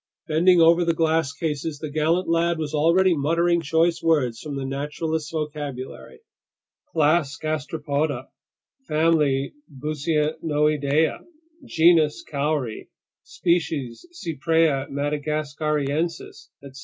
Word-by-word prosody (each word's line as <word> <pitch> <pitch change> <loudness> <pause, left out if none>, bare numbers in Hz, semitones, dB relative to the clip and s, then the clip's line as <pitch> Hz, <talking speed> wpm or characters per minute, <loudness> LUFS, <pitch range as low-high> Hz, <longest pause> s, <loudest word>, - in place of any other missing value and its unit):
Bending 175 +3 +4
over 170 +1 +5
the 170 -1 +1
glass 160 -2 +1
cases, 150 -1 -3
the 150 0 -6
gallant 160 +4 +1
lad 165 +1 +1
was 155 -1 -4
already 170 +4 +3
muttering 170 +4 +1
choice 165 +2 +1
words 145 -8 +1
from 150 -2 -6
the 135 -1 -4
naturalist's 150 +3 -3
vocabulary: 150 - -6 0.7
class 155 -2 +2
Gastropoda, 155 -1 -2 0.6
family 150 -4 +2 0.2
Buccinoidea, 150 0 0 0.5
genus 160 -2 +3
cowry, 140 -5 -3 0.3
species 155 - -2
Cypraea 160 - 0
madagascariensis, 150 +2 -2 0.2
etc. 140 -1 -11
155 Hz, 95 wpm, -23 LUFS, 145-165 Hz, 0.7 s, over